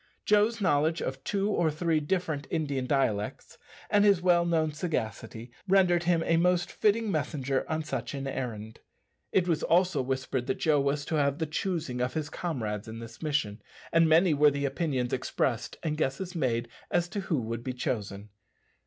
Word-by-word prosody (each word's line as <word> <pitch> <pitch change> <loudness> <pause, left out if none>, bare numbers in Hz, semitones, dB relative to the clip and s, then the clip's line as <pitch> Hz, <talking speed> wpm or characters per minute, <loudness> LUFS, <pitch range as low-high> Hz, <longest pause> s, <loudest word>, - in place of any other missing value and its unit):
Joe's 210 +2 +3
knowledge 160 -3 +2
of 135 0 -4
two 200 0 0
or 170 -5 +2
three 160 +1 0
different 155 -3 -2
Indian 140 -5 -1
dialects, 110 -7 -1 0.3
and 205 0 +3
his 200 -3 +5
well 175 -1 +3
known 160 -2 +1
sagacity, 115 - -4 0.2
rendered 180 -3 +4
him 170 -1 +2
a 165 - +3
most 180 +1 +2
fitting 215 0 +1
messenger 135 -6 -1
on 160 0 -1
such 150 -1 -4
an 135 0 -4
errand. 110 -5 -5 0.5
It 180 -2 +2
was 165 -3 +1
also 175 -4 +2
whispered 130 -1 -2
that - - 0
Joe 150 -3 +2
was 140 +1 0
to 160 - -1
have 140 -1 +1
the 160 - -1
choosing 155 -5 -2
of 125 +4 -1
his 155 -1 -3
comrades 110 - -3
in 110 0 -7
this 115 0 -10
mission, 140 -9 -1 0.3
and 165 -1 +4
many 165 +1 +5
were 150 +1 +5
the 140 0 -2
opinions 135 -4 -1
expressed 125 -2 -1
and 155 -2 -1
guesses 160 +5 -2
made 120 -8 0 0.2
as 175 0 +1
to 205 - -3
who 170 -7 -1
would 115 0 -4
be 130 - -3
chosen. 105 -5 -4
150 Hz, 180 wpm, -29 LUFS, 130-175 Hz, 0.5 s, his